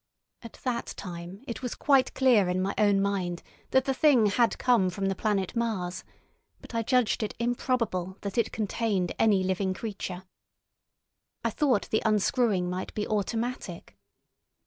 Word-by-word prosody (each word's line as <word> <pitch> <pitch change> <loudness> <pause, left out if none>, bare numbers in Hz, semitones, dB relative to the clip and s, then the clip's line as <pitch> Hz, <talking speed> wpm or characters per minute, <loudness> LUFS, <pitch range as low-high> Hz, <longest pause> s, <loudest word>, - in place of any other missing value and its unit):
At 230 - -10
that 245 -2 -2
time 180 +3 -8
it 235 - -5
was 250 -2 -4
quite 275 -3 +3
clear 235 -8 +4
in 180 +1 0
my 190 +2 0
own 205 -2 +3
mind 185 -3 -1 0.3
that 265 0 +3
the 270 - +1
Thing 260 -5 +4
had 230 +3 +2
come 235 -7 +3
from 195 +2 -3
the 195 - +1
planet 200 -1 -1
Mars, 210 -7 -2 0.6
but - - -13
I 230 - +1
judged 250 0 +2
it 215 - -3
improbable 235 -6 -1
that 200 -1 -5
it 235 - +1
contained 210 -4 -1
any 205 -4 +4
living 190 0 0
creature. 190 -4 -5 1.2
I - - 0
thought 250 - +1
the 220 - +2
unscrewing 215 -2 +2
might 180 +1 -4
be 210 - -1
automatic. 215 - -3
210 Hz, 155 wpm, -28 LUFS, 190-235 Hz, 1.2 s, clear